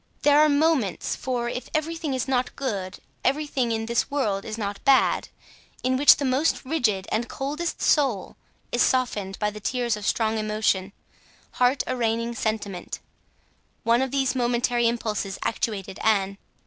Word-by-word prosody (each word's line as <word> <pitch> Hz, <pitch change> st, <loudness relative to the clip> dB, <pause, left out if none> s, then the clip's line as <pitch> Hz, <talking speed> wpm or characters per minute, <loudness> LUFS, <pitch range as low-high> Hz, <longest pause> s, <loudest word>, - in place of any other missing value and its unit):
There 290 Hz, 0 st, +6 dB
are 305 Hz, -, +5 dB
moments—for 260 Hz, -, 0 dB
if 250 Hz, +1 st, -5 dB
everything 310 Hz, -2 st, -1 dB
is 260 Hz, -, -2 dB
not 255 Hz, -1 st, 0 dB
good, 200 Hz, -9 st, -3 dB, 0.3 s
everything 275 Hz, -3 st, 0 dB
in 225 Hz, 0 st, -1 dB
this 235 Hz, +3 st, 0 dB
world 215 Hz, -9 st, -1 dB
is 220 Hz, 0 st, -5 dB
not 205 Hz, -2 st, -4 dB
bad—in 260 Hz, -1 st, 0 dB
which 285 Hz, +3 st, +8 dB
the 280 Hz, -, -3 dB
most 265 Hz, +3 st, +1 dB
rigid 230 Hz, -10 st, 0 dB
and 225 Hz, +2 st, 0 dB
the -, -, -21 dB
coldest 300 Hz, +5 st, -3 dB
soul 265 Hz, -, +2 dB, 0.4 s
is 240 Hz, -, +1 dB
softened 210 Hz, -7 st, +1 dB
by 210 Hz, -1 st, 0 dB
the 210 Hz, -, -9 dB
tears 240 Hz, +1 st, -1 dB
of 210 Hz, -2 st, -5 dB
strong 220 Hz, -1 st, +1 dB
emotion, 210 Hz, -3 st, 0 dB, 0.6 s
heart 250 Hz, +2 st, +2 dB
arraigning 230 Hz, -1 st, -1 dB
sentiment: 215 Hz, -5 st, -3 dB, 0.9 s
one 235 Hz, +2 st, +3 dB
of 265 Hz, -, 0 dB
these 265 Hz, -1 st, +1 dB
momentary 240 Hz, -1 st, +1 dB
impulses 215 Hz, -4 st, -2 dB
actuated 200 Hz, -4 st, -3 dB
Anne. 200 Hz, -2 st, +1 dB
240 Hz, 150 wpm, -25 LUFS, 215-265 Hz, 0.9 s, which